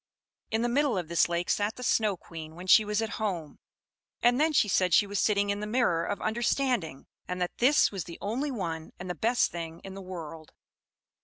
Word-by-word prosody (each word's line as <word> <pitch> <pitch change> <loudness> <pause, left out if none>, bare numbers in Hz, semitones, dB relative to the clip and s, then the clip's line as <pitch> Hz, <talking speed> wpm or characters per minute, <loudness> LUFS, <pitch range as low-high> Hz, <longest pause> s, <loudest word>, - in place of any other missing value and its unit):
In 220 +1 0
the - - +2
middle 265 -2 +1
of 175 -3 -4
this 170 0 +3
lake 175 0 -1
sat 205 +1 0
the 250 - -8
Snow 215 -5 +2
Queen 160 -2 -10
when 180 +2 -9
she 215 +4 +7
was 210 +1 -1
at 225 +1 -4
home; 175 -8 -3 0.6
and 245 +3 +4
then 315 +1 +3
she 250 -7 +3
said 185 -3 +3
she 205 - +5
was 200 0 -3
sitting 205 -1 +2
in 200 - -2
the 210 - -4
Mirror 210 -8 +1
of 205 - -3
Understanding, 230 - 0 0.2
and 180 0 -4
that 180 -1 -3
this 275 +5 +4
was 195 -4 -4
the 170 - -9
only 250 +8 -2
one 165 - -4
and 180 0 -5
the - - -2
best 235 +6 +1
thing 165 -1 -6
in 195 - -8
the 195 - -8
world. 165 -4 -8
200 Hz, 220 wpm, -28 LUFS, 170-230 Hz, 0.6 s, she